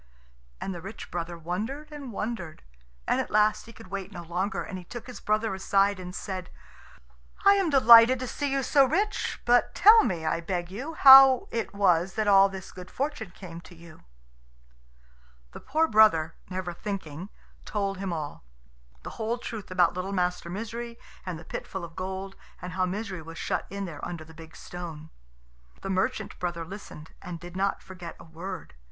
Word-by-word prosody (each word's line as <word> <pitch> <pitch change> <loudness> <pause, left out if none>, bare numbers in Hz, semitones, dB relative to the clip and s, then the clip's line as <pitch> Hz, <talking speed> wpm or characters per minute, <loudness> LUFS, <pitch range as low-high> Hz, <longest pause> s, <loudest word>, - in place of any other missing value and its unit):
And 195 - -4
the 175 - -7
rich 200 +4 -9
brother 170 0 -4
wondered 220 - -4
and 285 -4 -8
wondered, 205 -6 -5 0.4
and - - +2
at - - -6
last 215 +1 +2
he - - -10
could 185 -3 -14
wait 195 0 -5
no 175 -3 -8
longer, 185 +4 -2
and 190 -3 -6
he - - -11
took 240 +6 -9
his 250 - -9
brother 215 0 0
aside 195 +1 +2
and 180 0 -7
said, 185 -2 -5 1.0
"I 400 - +9
am 390 -4 +2
delighted 240 -3 +8
to 255 +1 -5
see 285 +2 -2
you 275 0 0
so 275 +2 +5
rich. 410 +11 0
But 245 0 +3
tell 440 +2 +8
me, 170 -6 -2
I 160 +1 0
beg 175 0 -3
you, 275 +11 -6
how 270 -2 +9
it 230 -3 -3
was 185 -2 +2
that 215 -1 0
all 195 -1 +7
this 190 -1 -8
good 180 0 -10
fortune 275 -7 -3
came 170 -1 -10
to 175 +2 -15
you." 170 -1 -15 1.5
The - - -9
poor 315 +4 +1
brother, 210 - +5 0.2
never 185 -1 -4
thinking, 185 -2 -6 0.3
told 200 -2 -2
him 195 -2 -3
all 150 - -5 0.6
the - - -7
whole 225 +2 -1
truth 225 -3 -7
about 180 -2 +3
little 185 +2 -4
Master 180 -2 -1
Misery 230 +4 -5 0.3
and 180 -3 -3
the 160 - -12
pit - - -6
full 190 -3 -5
of 165 -1 -13
gold, 190 +1 -5 0.2
and 180 0 -7
how 185 0 +1
Misery 195 -2 -4
was 165 +1 -10
shut - - -2
in 200 0 -4
there 155 -5 -8
under 170 -2 -5
the 160 - -15
big 160 -1 -13
stone. 160 -3 -8 0.7
The 195 - -2
merchant 190 0 -1
brother 170 -2 -3
listened, 170 -4 -10
and 175 -2 -7
did 175 +1 -11
not 195 +1 -1
forget 180 -3 -9
a - - -11
word. 170 +2 -8
190 Hz, 185 wpm, -27 LUFS, 175-225 Hz, 1.5 s, I